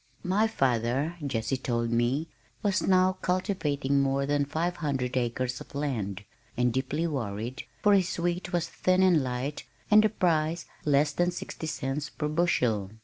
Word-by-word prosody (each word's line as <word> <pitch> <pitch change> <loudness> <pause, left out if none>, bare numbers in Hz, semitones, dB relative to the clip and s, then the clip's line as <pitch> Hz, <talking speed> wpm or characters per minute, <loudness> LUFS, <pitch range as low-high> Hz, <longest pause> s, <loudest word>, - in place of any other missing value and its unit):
My 200 +5 +2
father, 135 - 0
Jessie 130 -1 -1
told 120 -2 -1
me, 120 +7 +1 0.4
was 200 -3 +2
now 185 0 +3
cultivating 150 -7 0
more 140 0 +1
than 145 0 +1
five 165 +5 -2
hundred 130 -5 -2
acres 125 0 -1
of - - -12
land, 110 -9 -2 0.3
and 125 -1 +2
deeply 135 +5 -1
worried, 120 -5 -3 0.2
for 205 - +6
his 190 -3 +2
wheat 175 +1 -1
was 175 -2 0
thin 185 +2 +2
and 180 -5 +5
light 130 +3 -3 0.3
and 215 0 +8
the 215 - +4
price 165 -4 0 0.2
less 145 0 +3
than 175 +4 +1
sixty 175 -2 -6
cents 140 0 -3
per 150 - -3
bushel. 125 - +1
145 Hz, 155 wpm, -28 LUFS, 125-175 Hz, 0.4 s, and